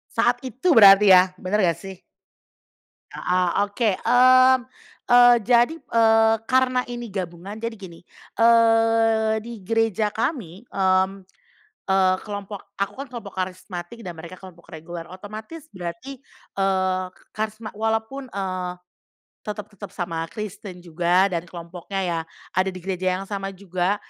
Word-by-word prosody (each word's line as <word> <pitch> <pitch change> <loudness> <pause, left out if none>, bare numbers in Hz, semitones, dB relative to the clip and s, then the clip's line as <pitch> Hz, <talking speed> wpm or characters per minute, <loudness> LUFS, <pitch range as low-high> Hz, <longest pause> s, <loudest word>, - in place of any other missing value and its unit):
Saat 240 +1 +2
itu 260 - -1
berarti 200 -4 +8
ya? 185 0 +6
Bener 205 +3 -1
gak 170 -2 +2
sih? 195 -1 -9 1.2
Heeh, 180 0 0 0.2
oke. 205 +2 0
Mmm, 255 +2 +6 0.5
eee, 245 0 +7
jadi, 245 +5 +4
eee, 225 -2 +3
karena 255 0 +2
ini 240 0 -6
gabungan, 185 0 -6
jadi 230 +1 -5
gini, 175 -4 -11 0.4
eee, 225 -1 +3
di 230 -2 -10
gereja 220 0 0
kami, 225 - -4
mmm, 190 0 +1 0.6
eee, 190 -1 +3
kelompok, 200 -1 -8
aku 200 0 -2
kan 275 - -5
kelompok 235 -6 -9
karismatik 185 +3 -6
dan 175 -4 -8
mereka 170 +3 -9
kelompok 180 -2 -14
reguler, 165 +1 -8
otomatis 215 - -10
berarti, 180 +9 -7 0.4
eee, 185 -1 +1
ke - - -25
karisma 215 +1 -5
walaupun, 225 +5 -2
eee, 185 -2 -3 0.7
tetep 210 0 -4
tetep 205 0 -9
sama 165 -3 -3
Kristen 195 -3 -8
juga 175 +3 +2
dan 170 0 -3
kelompoknya 175 +3 -7
ya, 170 -2 -1 0.3
ada 185 +1 +1
di 185 -2 -6
gereja 185 -1 -1
yang 190 - -5
sama 195 0 -5
juga, 185 0 -1
200 Hz, 135 wpm, -23 LUFS, 185-225 Hz, 1.2 s, berarti